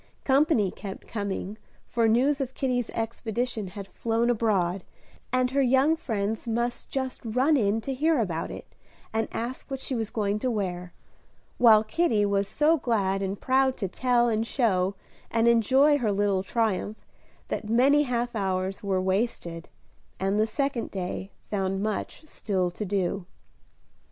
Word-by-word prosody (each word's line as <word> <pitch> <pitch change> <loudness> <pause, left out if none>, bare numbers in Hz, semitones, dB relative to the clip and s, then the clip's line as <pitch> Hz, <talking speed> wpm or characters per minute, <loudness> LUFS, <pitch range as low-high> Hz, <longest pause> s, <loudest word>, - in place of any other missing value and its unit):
Company 265 - +3
kept 195 -2 -8
coming, 200 0 -4 0.3
for 230 -1 +1
news 270 +6 +3
of 260 -1 -4
Kitty's 250 -3 -1
expedition 225 -1 -3
had 195 +1 -8
flown 230 +3 0
abroad, 195 -6 +1 0.5
and 255 0 +1
her 275 +1 +2
young 265 +4 +4
friends 220 -6 -3
must 235 +1 -2
just 260 -1 -3
run 255 +7 +2
in 220 -3 +2
to 270 - -3
hear 310 +4 +2
about 170 -7 -2
it, - - -8 0.5
and 225 0 0
ask 245 +5 -5
what 270 -1 -4
she 265 - -5
was 225 -3 -2
going 210 -1 -1
to 255 - -1
wear; 180 -5 -3 0.7
while 220 -3 +7
Kitty 220 -4 +1
was 200 -1 +1
so 305 +7 +3
glad 200 -7 0
and 195 +1 -3
proud 265 0 +2
to 195 - -2
tell, 240 +5 +2
and 225 0 0
show, 195 -7 +1 0.3
and 230 0 +2
enjoy 265 +6 +4
her 220 -5 +1
little 200 -1 +1
triumph 215 0 -1 0.4
that 210 - -3
many 270 +6 +5
half 240 -3 -1
hours 190 -1 -1
were 195 -2 0
wasted, 185 -3 -2 0.5
and 195 +2 +1
the 215 - +3
second 270 +1 -2
day 190 0 -4 0.2
found 195 -2 -1
much 215 +8 -3
still 190 - -2
to 210 +4 -5
do. 190 -1 -1
225 Hz, 155 wpm, -27 LUFS, 195-250 Hz, 0.7 s, while